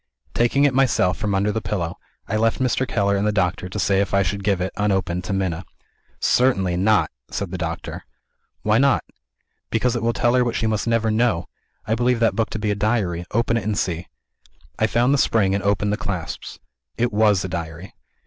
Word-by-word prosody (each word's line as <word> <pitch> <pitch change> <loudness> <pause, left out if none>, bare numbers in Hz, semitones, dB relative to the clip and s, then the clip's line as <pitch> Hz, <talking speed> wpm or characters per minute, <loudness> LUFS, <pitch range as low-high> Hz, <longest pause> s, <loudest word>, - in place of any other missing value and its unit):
Taking 130 +4 +3
it 140 - +3
myself 125 -9 +2
from 105 -2 -1
under 100 +2 +1
the 110 +1 -2
pillow, 95 -4 -3 0.3
I 110 - -2
left 115 +1 +2
Mr. 130 0 0
Keller 100 -4 +1
and 100 +1 0
the - - +2
doctor 90 -2 -1
to - - -6
say 95 -1 +2
if 100 -1 -1
I 100 - +4
should 100 +3 -3
give 100 -2 +1
it, 95 +1 -2
unopened, 95 -3 0
to - - -4
Minna. 95 -3 -1 0.6
"Certainly 95 -9 +2
not!" 105 +3 +3 0.2
said 100 -3 -4
the 95 - -3
doctor. 85 -1 -4 0.6
"Why 105 +1 +3
not?" 140 -1 +3 0.7
"Because 120 +2 +1
it 120 - -1
will 115 +1 +2
tell 120 +1 +2
her 125 -1 +4
what 120 -1 -2
she 110 - 0
must 110 0 -1
never 115 -1 +2
know. 110 -6 +1 0.4
I 110 - 0
believe 120 +1 +1
that 115 - +2
book 115 -1 0
to - - -4
be 105 -1 -1
a - - 0
Diary. 100 -5 0
Open 115 +1 +1
it, 115 - -2
and 105 0 -1
see." 85 -1 -2 0.7
I 110 - +3
found 120 +4 +2
the 145 - +2
spring 100 -6 +2
and 100 -1 -1
opened 100 +1 +1
the - - -1
clasps. 100 -8 -5 0.4
It 120 -1 0
was 105 -3 +3
a - - -2
Diary. 85 +1 -6
105 Hz, 215 wpm, -22 LUFS, 95-115 Hz, 0.7 s, I